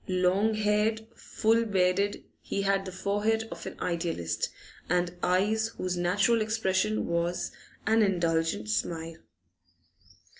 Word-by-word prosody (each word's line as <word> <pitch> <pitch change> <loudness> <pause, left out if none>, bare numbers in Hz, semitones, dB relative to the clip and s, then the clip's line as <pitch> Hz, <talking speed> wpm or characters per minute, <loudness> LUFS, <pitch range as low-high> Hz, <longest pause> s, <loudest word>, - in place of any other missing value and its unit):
Long 185 +4 +2
haired, 215 +1 +1
full 225 +1 +1
bearded, 195 -1 +1 0.2
he 200 - -2
had 195 0 +1
the 185 - -5
forehead 205 +4 0
of 170 0 -7
an - - -8
idealist 165 - -2 0.4
and 175 0 +1
eyes 210 +5 +2
whose 185 -1 -2
natural 200 +6 +2
expression 215 -1 0
was 170 +1 -1 0.3
an 220 +1 +4
indulgent 165 - +1
smile. 160 +10 -2
190 Hz, 115 wpm, -28 LUFS, 175-215 Hz, 0.4 s, an